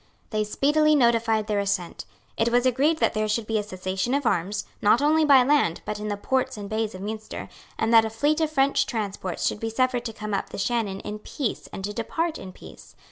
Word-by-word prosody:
They 215 -1 +1
speedily 300 +8 +3
notified 230 -4 +3
their 210 -1 0
assent. 195 -4 -2 0.3
It 225 +1 +1
was 245 +1 +2
agreed 275 +6 +2
that - - +1
there 215 0 0
should 215 +1 -1
be 220 0 0
a - - -2
cessation 190 +4 -2
of 285 -1 -1
arms, 200 0 0 0.2
not 210 +3 +5
only 310 +2 +3
by 275 -3 +7
land, 275 - +2
but 210 -1 -4
in 210 - -4
the 205 -1 -2
ports 260 +2 -1
and 205 -1 -6
bays 220 -1 -2
of 185 - -8
Munster, 215 +2 -6 0.3
and 225 +1 0
that 225 -1 +8
a 220 - -2
fleet 290 +8 +1
of 315 - +2
French 275 -2 +2
transports 200 -5 -3
should - - 0
be 225 - -2
suffered 250 +1 0
to 225 - -3
come 215 -1 -6
up 195 - -2
the - - -8
Shannon 205 -2 -1
in 210 0 -6
peace 250 +3 -4
and 195 - -7
to 205 +1 -3
depart 320 +9 -2
in 190 - -8
peace. - - -14
225 Hz, 230 wpm, -25 LUFS, 205-260 Hz, 0.3 s, that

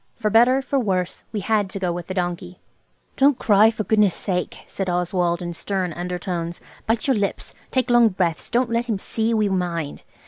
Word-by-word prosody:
For 215 -2 -1
better, 250 +4 +5
for 275 0 0
worse, 185 -6 -1
we 210 -2 -3
had 205 0 +1
to 195 - -6
go 180 -2 0
with 170 0 -5
the 185 - -5
donkey. 175 0 -3 0.6
"Don't 275 -1 +4
cry, 210 +1 +5
for 220 -1 -3
goodness' 210 -4 +3
sake!" 180 -3 -2
said 195 -2 -4
Oswald 175 0 0
in 175 0 -4
stern 185 0 -2
undertones. 175 -1 -4 0.3
"Bite 225 0 +1
your 270 - +3
lips. 200 -2 -2 0.2
Take 255 -2 0
long 240 -1 +6
breaths. 175 -4 -2
Don't 240 0 +1
let 235 +1 0
him 220 -4 0
see 220 +3 -1
we 215 -1 +2
mind. 175 -6 -2
195 Hz, 195 wpm, -22 LUFS, 175-225 Hz, 0.6 s, long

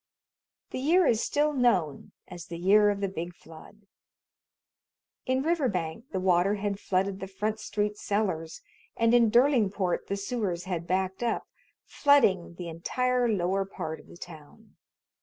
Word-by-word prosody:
The - - -4
year 335 +7 +3
is 225 -5 +2
still 300 +1 +1
known 190 - +1 0.2
as 175 -2 -10
the 170 - -6
"year 205 +4 +4
of 200 -1 -2
the 200 - +1
big 175 -2 -6
flood." 175 +7 -15 1.4
In 260 +1 +1
Riverbank 235 - -1
the 190 - -3
water 185 +2 +2
had 200 -1 -3
flooded 195 0 -1
the 195 - -6
Front 210 +3 -3
Street 210 -1 -2
cellars, 185 -6 -2 0.4
and 230 0 +3
in 235 -2 +5
Derlingport 215 -7 +2
the 200 - -2
sewers 200 -5 -3
had 175 -2 -4
backed 190 +2 -1
up, 235 -1 -1 0.4
flooding 200 -12 +3
the 175 0 -7
entire 250 +9 0
lower 195 -1 0
part 160 -5 -6
of - - -17
the - - -14
town. 175 +6 -13
200 Hz, 150 wpm, -28 LUFS, 180-235 Hz, 1.4 s, in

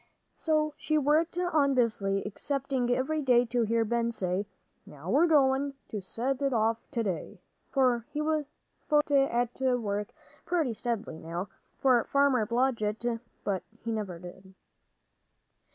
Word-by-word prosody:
So 305 -1 +1
she 310 - 0
worked 305 +4 +2
on 310 -6 +2
busily, 200 -5 +1
expecting 265 +3 -2
every 270 +5 +1
day 245 -3 +4
to 240 +1 0
hear 230 0 +2
Ben 235 +1 0
say, 190 -2 -2 0.4
"Now 150 +6 -7
we're 310 +8 +5
goin' 275 -2 +3
to 210 - -4
set 250 +8 -2
it 275 -1 +1
off 225 0 +2
to 235 - 0
day," 190 -5 -4 0.3
for 250 -5 +2
he 300 - -4
was 305 0 0 0.7
at 245 -3 +2
work 215 -6 0 0.4
pretty 320 -9 0
steadily 220 -8 -3
now, 170 +4 -5 0.3
for 250 -4 +4
Farmer 275 -6 +3
Blodgett. 235 -2 0 0.2
But 195 -2 -1 0.2
he 230 - -2
never 205 -6 -3
did. 185 +2 -12
240 Hz, 135 wpm, -29 LUFS, 210-275 Hz, 0.7 s, we're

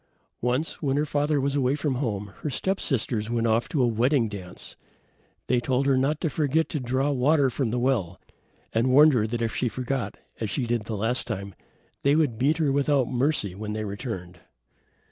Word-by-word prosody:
Once, 125 +6 -1
when 140 -2 0
her 150 - +2
father 145 0 +1
was 140 +1 0
away 135 -1 +2
from 145 -2 -1
home, 105 -7 -3
her 150 - -3
step 190 +7 -1
sisters 115 -5 -1
went 115 -1 0
off 115 +1 +1
to 140 -5 +1
a - - +4
wedding 120 +2 +2
dance. 95 -4 -7 0.7
They 125 - +2
told 130 +2 0
her 135 -1 +4
not 140 +4 +1
to 165 - +1
forget 155 +2 +1
to 150 - -2
draw 130 +3 0
water 140 +1 +3
from 130 -1 -1
the 120 - -1
well, 120 -9 0 0.5
and 115 +3 +2
warned 150 +3 +7
her 110 -3 +2
that 115 +1 -2
if 115 -2 -2
she 125 - +1
forgot, 130 +1 -3 0.2
as 110 - -2
she 125 +5 -1
did 115 -2 -1
the 110 -1 -4
last 115 +4 -1
time, 100 -4 -4 0.5
they 140 +1 +3
would 145 -8 +1
beat 145 +4 +2
her 155 -4 +2
without 140 -2 +2
mercy 125 -6 +1
when 105 +2 -5
they 110 0 -3
returned. 100 -4 -6
125 Hz, 200 wpm, -26 LUFS, 110-140 Hz, 0.7 s, warned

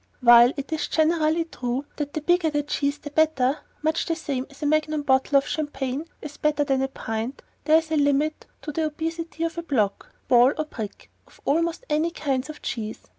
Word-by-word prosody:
While 240 0 +8
it 280 +3 -4
is 315 - -1
generally 320 0 +2
true 255 -3 -3
that 290 -1 -3
the 310 - -2
bigger 350 +1 +2
the 295 -1 -1
cheese 285 0 -1
the 290 0 -9
better, 295 -3 +2 0.2
(much 315 +1 0
the 330 - 0
same 275 -5 -3
as 280 +1 -11
a - - 0
magnum 310 0 +1
bottle 265 0 +3
of 275 - +2
champagne 290 -1 -3 0.2
is 290 -1 -8
better 300 -1 +1
than 270 -2 +1
a 270 - +1
pint), 225 0 -5 0.2
there 310 +1 +6
is 320 0 -2
a 315 - +2
limit 290 +2 +1 0.2
to 300 - -4
the 315 +2 -1
obesity 325 +1 -4
of 330 +1 -2
a - - -2
block, 225 -12 -1 0.2
ball 245 +2 +6
or 310 - -1
brick 220 -9 -8 0.2
of - - -21
almost 335 - 0
any 310 +3 +1
kinds 280 -4 -2
of 305 - -9
cheese. 220 -2 -4
295 Hz, 205 wpm, -24 LUFS, 270-315 Hz, 0.2 s, While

